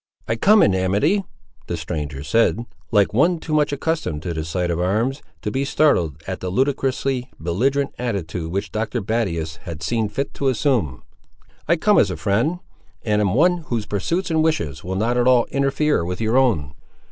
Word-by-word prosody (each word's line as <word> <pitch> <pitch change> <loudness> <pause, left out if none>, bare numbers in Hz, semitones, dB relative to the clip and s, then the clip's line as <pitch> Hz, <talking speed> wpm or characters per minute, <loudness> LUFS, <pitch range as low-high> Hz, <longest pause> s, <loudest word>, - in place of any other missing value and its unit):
"I 115 - 0
come 210 - +5
in 100 - +4
amity," 100 - +1 0.4
the 85 - -3
stranger 75 -4 -5
said, 115 - +2 0.2
like 105 -2 +3
one 165 +9 +3
too 160 -1 -5
much 150 -1 +2
accustomed 145 - -2
to 85 - -3
the 80 -1 -3
sight 85 +2 -2
of 85 - -1
arms 110 +10 0 0.2
to 105 - -2
be 135 +4 0
startled 90 - +2
at 95 -1 -4
the 95 - -4
ludicrously 135 +2 0
belligerent 130 - 0
attitude 90 -8 -3
which 100 +2 -3
Dr. 110 +3 -2
Battius 95 -7 -2
had 85 -3 -8
seen 110 +4 0
fit 135 +7 -3
to 140 - -2
assume. 115 - 0 0.6
"I 170 - +4
come 205 +5 +3
as 100 - +3
a 90 - -4
friend; 115 - 0 0.4
and 105 -1 +1
am 100 -1 +1
one 175 +6 +4
whose 115 -3 -2
pursuits 165 - -2
and 160 -1 +2
wishes 85 - -1
will 95 +1 -4
not 115 +5 0
at 120 0 +2
all 125 -2 +5
interfere 140 - +1
with 90 +1 -4
your 110 +1 0
own." 105 - +2
110 Hz, 185 wpm, -21 LUFS, 90-140 Hz, 0.6 s, come